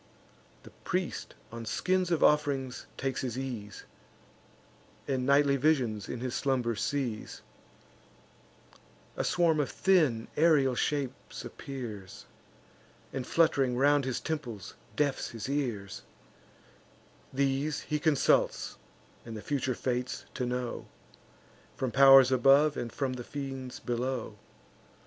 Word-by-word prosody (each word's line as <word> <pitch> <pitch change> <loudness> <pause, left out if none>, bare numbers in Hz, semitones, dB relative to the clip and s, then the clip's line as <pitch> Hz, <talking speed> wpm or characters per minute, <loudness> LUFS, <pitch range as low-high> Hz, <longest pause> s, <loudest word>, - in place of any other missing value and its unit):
The - - -13
priest - - -3 0.2
on 115 0 -7
skins 185 +10 0
of 170 -3 +1
off'rings 140 -4 +1
takes 135 0 -2
his 125 -2 -3
ease, 115 -6 -6 1.2
And 130 -2 -1
nightly 140 0 +4
visions 125 -8 +1
in 120 - -5
his 125 -1 -3
slumber 125 -4 0
sees; 120 -1 -3 1.7
A - - -1
swarm 170 -3 +2
of 145 - 0
thin 155 -12 +2
aerial 150 -5 +4
shapes 135 +1 -3
appears, 115 -9 -8 0.9
And, 130 -2 -4
flutt'ring 135 -7 +2
round 145 +1 +4
his 130 -2 -2
temples, 125 - -5 0.2
deafs 145 -2 0
his 115 -1 -6
ears: 120 -9 -3 1.3
These 140 +2 0
he 150 -1 -2
consults, 150 -3 +2 0.5
the 115 -2 -7
future 130 +1 -1
fates 125 0 -3
to 125 -2 -2
know, 125 -1 -3 0.9
From 130 -2 -2
pow'rs 135 -1 +8
above, 135 +4 +5
and 120 -1 -4
from 135 +1 -2
the 125 -1 -6
fiends 135 -2 -6
below. 120 -2 -3
130 Hz, 110 wpm, -30 LUFS, 120-145 Hz, 1.7 s, pow'rs